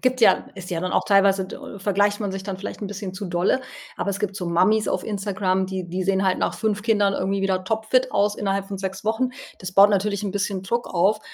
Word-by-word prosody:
gibt 255 0 +1
ja 225 - +5
ist 185 -3 -9
ja 170 - -1
dann 185 +1 -2
auch - - +2
teilweise 195 -1 +4
d - - -8 0.2
vergleicht 205 +1 +1
man 205 -2 -1
sich 190 0 -5
dann 190 -1 -5
vielleicht 205 - -7
'n - - -2
bisschen 195 -1 -6
zu 200 +2 -5
dolle. 180 +7 +1 0.4
Aber 200 - -1
es 200 - -3
gibt 200 -2 -2
so 180 - -4
Mamis 185 +6 +3
auf - - -1
Instagram, 195 -2 -1
die 185 -2 -5
die 185 +2 -2
sehen 190 0 +2
halt 190 -1 +2
nach - - 0
5 210 -2 -1
Kindern 205 -3 +2
irgendwie 195 +1 -1
wieder 190 -1 0
topfit 220 +5 +1
aus 205 +1 +2
innerhalb 195 -1 -1
von 200 - -4
6 190 0 -5
Wochen. 235 +3 +1 0.3
Das 185 0 -6
baut 195 +2 +8
natürlich 200 0 0
'n 205 - -2
bisschen 200 -1 -2
Druck 235 +5 -1
auf. 210 +5 +3
195 Hz, 245 wpm, -23 LUFS, 190-210 Hz, 0.4 s, baut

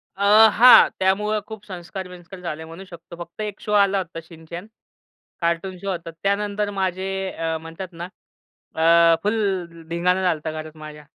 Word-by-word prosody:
अ, 195 - -9 0.3
हां 245 +4 +8
त्यामुळं 210 +3 +1
खूप 220 -2 -10
संस्कार-बिंस्कार 180 -1 -9
झाले 160 -2 -5
म्हणू 165 +4 -10
शकतो. 170 -1 -12
फक्त 170 +5 -12
1 210 -1 -5
शोआला 200 -2 +2
होता 175 -3 -4
शिनचॅन, 165 +3 -10 0.7
कार्टून 170 +3 -1
शो 195 - -5
होता. 170 -2 -5
त्यानंतर 205 +1 0
माझे 190 0 -1 0.2
अ, 165 0 -3
म्हणतात 165 +3 -9
ना, 170 +1 -7 0.7
अ, 165 0 +6
फुल 190 -6 -2
धिंगाणा 180 +2 +1
झालता 160 -3 -1
घरात 155 0 -8
माझ्या. 150 -1 -11
180 Hz, 145 wpm, -22 LUFS, 165-195 Hz, 0.7 s, हां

